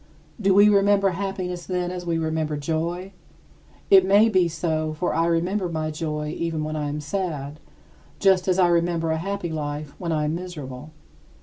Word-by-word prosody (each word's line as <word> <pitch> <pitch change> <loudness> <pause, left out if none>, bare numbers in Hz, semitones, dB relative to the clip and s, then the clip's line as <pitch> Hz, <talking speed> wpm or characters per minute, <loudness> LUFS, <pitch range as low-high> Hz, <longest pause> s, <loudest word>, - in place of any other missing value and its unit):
Do 195 -1 +3
we 205 +1 +7
remember 200 -1 +4
happiness, 180 -1 -4
then, 180 -1 -1
as 180 -1 -6
we 165 -1 +1
remember 160 -1 -1
joy? 170 +5 -3 0.8
It 190 -1 +8
may 200 +4 +5
be 185 -4 +3
so, 155 -1 -2
for 165 +3 -1
I 165 +1 +1
remember 175 +3 0
my 155 -1 -2
joy 150 -1 -3
even 165 -2 -2
when 155 0 -3
I 150 -1 -2
am 150 +1 -3
sad, 150 -3 -4 0.6
just 190 -2 +3
as 185 -1 +2
I 185 -2 +5
remember 170 -1 +1
a 160 - 0
happy 195 0 -3
life 150 -1 -4
when 170 -2 -3
I 155 -1 0
am 150 - -1
miserable. 150 -6 -7
170 Hz, 180 wpm, -24 LUFS, 155-185 Hz, 0.8 s, It